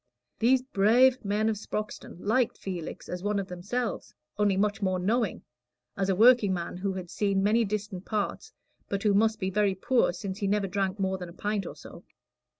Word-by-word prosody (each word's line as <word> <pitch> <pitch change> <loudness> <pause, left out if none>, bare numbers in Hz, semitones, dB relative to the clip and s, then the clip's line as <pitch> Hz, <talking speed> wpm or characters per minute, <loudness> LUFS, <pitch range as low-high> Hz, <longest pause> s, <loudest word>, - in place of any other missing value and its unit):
These 255 +3 +4
"brave" 250 +3 +4
men 210 +2 0
of 220 -1 0
Sproxton 210 -3 -5
liked 235 +3 +1
Felix 180 -4 -6
as 180 0 -5
one 205 +1 0
of 195 -1 -2
themselves, 205 +7 -4 0.2
only 205 -2 +2
much 205 +1 0
more 185 -2 +1
knowing 210 +3 0 0.5
as 195 0 -1
a 190 - +2
workingman 205 -6 +4
who 195 +1 -2
had 185 -2 -7
seen 195 -2 +1
many 220 +3 +3
distant 205 -3 -4
parts, 210 -1 -3 0.4
but 200 -1 -2
who 210 -2 +3
must 220 +2 +3
be 190 -1 -1
very 200 -1 +2
poor, 240 +5 +2
since 190 +2 -6
he 200 - -1
never 205 0 +1
drank 195 0 -1
more 190 -1 -1
than 180 -1 -7
a - - -12
pint 205 +1 -2
or - - -8
so. - - -12
200 Hz, 190 wpm, -28 LUFS, 190-215 Hz, 0.5 s, These